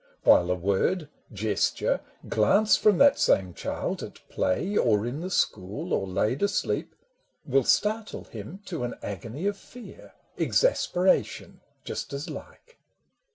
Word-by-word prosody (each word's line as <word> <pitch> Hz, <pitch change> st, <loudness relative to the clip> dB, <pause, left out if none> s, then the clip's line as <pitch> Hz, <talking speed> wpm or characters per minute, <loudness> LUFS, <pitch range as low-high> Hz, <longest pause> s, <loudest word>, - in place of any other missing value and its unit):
While 90 Hz, -, +5 dB
a 90 Hz, -, +2 dB
word, 100 Hz, -, 0 dB, 0.2 s
gesture, 105 Hz, -1 st, 0 dB, 0.3 s
glance 200 Hz, -, +4 dB
from 210 Hz, -3 st, +4 dB
that 285 Hz, 0 st, +5 dB
same 95 Hz, -2 st, +2 dB
child -, -, -3 dB
At -, -, -10 dB
play 185 Hz, -, -1 dB
or 110 Hz, -, +3 dB
in 130 Hz, +6 st, -4 dB
the 185 Hz, -, -4 dB
school 100 Hz, -, -1 dB
or 95 Hz, -, 0 dB
laid 105 Hz, +8 st, 0 dB
asleep, 200 Hz, 0 st, -1 dB, 0.5 s
Will 135 Hz, 0 st, +2 dB
startle 215 Hz, -, 0 dB
him 120 Hz, -, -9 dB
to 165 Hz, -8 st, -4 dB
an 120 Hz, -, -3 dB
agony 115 Hz, -, -5 dB
of 200 Hz, 0 st, 0 dB
fear, 245 Hz, +4 st, -13 dB, 0.3 s
Exasperation, 190 Hz, -, +1 dB, 0.2 s
just -, -, -5 dB
as 140 Hz, +2 st, -5 dB
like. 475 Hz, 0 st, -12 dB
135 Hz, 135 wpm, -27 LUFS, -, 0.5 s, While